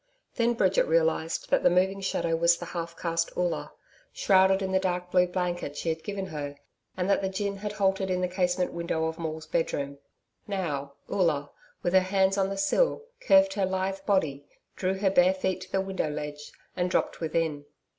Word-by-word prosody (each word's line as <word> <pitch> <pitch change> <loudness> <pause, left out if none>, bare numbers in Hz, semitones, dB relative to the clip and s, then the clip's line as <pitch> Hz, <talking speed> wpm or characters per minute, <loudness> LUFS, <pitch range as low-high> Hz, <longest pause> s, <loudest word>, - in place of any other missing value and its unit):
Then 235 0 +1
Bridget 190 -4 +2
realised 160 0 +1
that - - +4
the - - +5
moving 190 +2 +2
shadow 170 -3 0
was 170 +1 +4
the 175 - -7
half 170 -1 -5
caste 165 -1 -1
Oola, 175 -3 -1 0.4
shrouded 190 0 +4
in 190 - -2
the 190 - +3
dark 180 -1 -2
blue 180 -1 +4
blanket 175 -5 -3
she 165 - -2
had 160 0 -2
given 200 -2 -4
her, 145 -5 -5 0.4
and 180 0 0
that 200 - +3
the 190 - -1
gin 200 +1 -2
had 210 +1 -4
halted 195 -2 +1
at 180 -1 0
the 180 - +1
casement 180 0 0
window 170 -1 -1
of 160 +1 -3
Maule's 160 -1 -4
bedroom. 140 -3 -2 0.5
Now, 150 -9 -3
Oola, 155 -7 0 0.3
with 175 - 0
her 190 - +8
hands 190 +1 +2
on 195 -1 +1
the 195 - -4
sill, 450 - +2 0.2
curved 290 -12 +5
her 200 -2 +1
lithe 190 +1 -2
body, 150 -9 +1 0.3
drew 190 0 -1
her 190 -1 +2
bare 185 0 +5
feet 190 0 -2
to 185 0 -10
the 195 - +1
window 190 -5 -2
ledge 150 0 -6 0.2
and 180 0 0
dropped - - 0
within. 160 -3 -1
180 Hz, 195 wpm, -28 LUFS, 165-190 Hz, 0.5 s, her